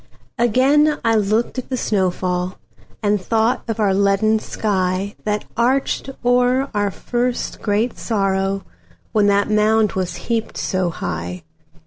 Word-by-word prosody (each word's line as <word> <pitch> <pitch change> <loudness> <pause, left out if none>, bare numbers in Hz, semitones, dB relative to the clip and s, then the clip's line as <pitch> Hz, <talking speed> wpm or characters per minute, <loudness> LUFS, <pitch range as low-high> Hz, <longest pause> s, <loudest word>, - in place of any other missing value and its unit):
Again 275 +6 +4
I 225 - +4
looked 215 +4 +1
at 255 - -8
the 260 - -1
snow 195 -6 +1
fall, 180 0 -2 0.5
And 205 -1 +2
thought 225 +5 +1
of 225 - -2
the 205 -3 +2
leaden 200 +2 +3
skyThat 200 +1 -2
arched 260 +4 +1 0.2
o'er 250 +2 +3
our 205 -1 +1
first 245 +5 -2
great 215 +3 0
sorrow, 195 -2 0 0.5
When 210 -2 +3
that 200 +1 +2
mound 215 0 +3
was 180 -2 -3
heaped 225 +5 -3
so 185 -2 0
high. 180 +1 -5
210 Hz, 130 wpm, -20 LUFS, 195-235 Hz, 0.5 s, Again